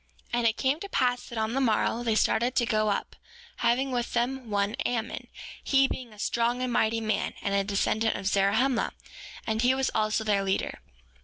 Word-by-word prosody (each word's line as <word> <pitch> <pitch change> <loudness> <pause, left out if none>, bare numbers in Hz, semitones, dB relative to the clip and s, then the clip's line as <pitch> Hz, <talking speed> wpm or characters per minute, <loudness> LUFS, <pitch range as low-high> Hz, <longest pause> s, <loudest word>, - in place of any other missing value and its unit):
7:3 240 - +2
And 235 - +3
it 220 0 +1
came 270 +3 +1
to 400 - -7
pass 250 -7 0
that 235 - -7
on 220 +1 -1
the 270 - +1
morrow 230 -1 +1
they 230 -2 +1
started 240 +3 +2
to 240 - +3
go 215 -2 +1
up, 200 - -2 0.4
having 245 +3 +1
with 245 -1 -2
them 245 0 -1
one 200 0 0
Ammon, 230 -2 -3 0.4
he 270 -1 +4
being 250 -3 -6
a 210 - -15
strong 235 +3 0
and 250 -1 -1
mighty 225 0 +2
man, 215 -2 -1
and 200 - -2
a 200 0 +2
descendant 215 +2 0
of - - -6
Zarahemla; 210 +6 +2 0.5
and 220 0 0
he 250 +2 +4
was 265 0 0
also 215 0 +1
their 205 -2 +1
leader. 195 0 -1
230 Hz, 205 wpm, -28 LUFS, 215-250 Hz, 0.5 s, he